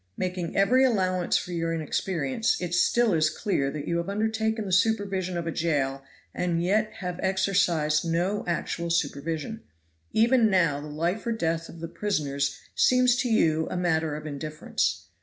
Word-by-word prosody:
Making 180 -2 -3
every 245 +7 +4
allowance 185 -7 +2
for 180 - -5
your 165 -1 -1
inexperience, 165 +3 -1
it 175 -1 -4
still 230 +4 +3
is 155 -1 +3
clear 155 -4 -1
that 145 0 -6
you 170 - 0
have 170 +2 -3
undertaken 220 +1 -1
the 190 - -4
supervision 195 -2 +1
of 170 - -3
a 165 - -2
jail 140 -5 -1 0.3
and 170 -1 -1
yet 215 +4 +1
have 180 -1 -4
exercised 180 -5 +1
no 175 +5 0
actual 170 0 -2
supervision; 165 +6 -2 0.5
even 230 0 +4
now 165 -7 +2
the 150 - -8
life 170 +9 -2
or - - +1
death 165 -6 -1
of 165 - -11
the 165 - -4
prisoners 145 -7 -1 0.2
seems 250 -1 +4
to 245 0 0
you 160 -7 +2
a - - -3
matter 160 -3 0
of 150 +1 -7
indifference. 155 +1 -2
175 Hz, 165 wpm, -26 LUFS, 160-205 Hz, 0.5 s, every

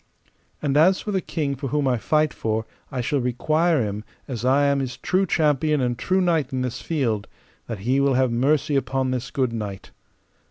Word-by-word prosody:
And 145 -1 +1
as 185 +5 +5
for 210 - -4
the 190 -2 0
king 150 -6 -2
for 135 +1 -5
whom 145 +1 0
I 125 -3 +1
fight 155 +5 +1
for, 110 0 -2 0.3
I 130 - -2
shall 140 +4 0
require 155 +5 +1
him, 105 +1 -4 0.2
as 120 -4 -5
I 135 +3 +4
am 140 0 +2
his 130 -2 -4
true 185 +2 +1
champion 150 -1 +2
and 125 -2 0
true 185 +9 +1
knight 165 -6 +1
in 130 -1 -1
this 125 -1 -4
field, 120 -10 -1 0.4
that 115 - -4
he 130 +3 +2
will 140 -1 +3
have 130 -1 +2
mercy 145 +5 +1
upon 135 -1 0
this 125 0 -3
good 130 -3 -1
knight. 105 -4 -6
135 Hz, 200 wpm, -23 LUFS, 125-155 Hz, 0.4 s, as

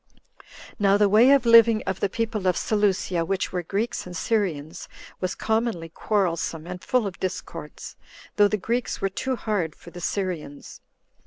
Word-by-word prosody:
9. - - -30 0.6
Now 200 -1 +4
the 205 0 +4
way 220 +6 +6
of 275 -3 +5
living 230 -1 +6
of 190 0 -2
the 200 - 0
people 220 -2 -2
of 180 - +2
Seleucia, 195 -5 0
which 190 +3 -2
were 180 - -1
Greeks 200 +4 -3
and 180 -1 -6
Syrians, 170 -7 -2 0.3
was 185 0 -2
commonly 220 -7 -1
quarrelsome, 170 -4 -1
and 180 +1 -7
full 250 +3 +1
of 195 -2 -6
discords, 185 0 -6 0.4
though 205 -1 +5
the 215 - -1
Greeks 235 +5 -2
were 195 - 0
too 260 +7 -2
hard 200 -9 -2
for 170 - -14
the 175 - -9
Syrians. 170 -7 -4
195 Hz, 170 wpm, -24 LUFS, 180-220 Hz, 0.6 s, way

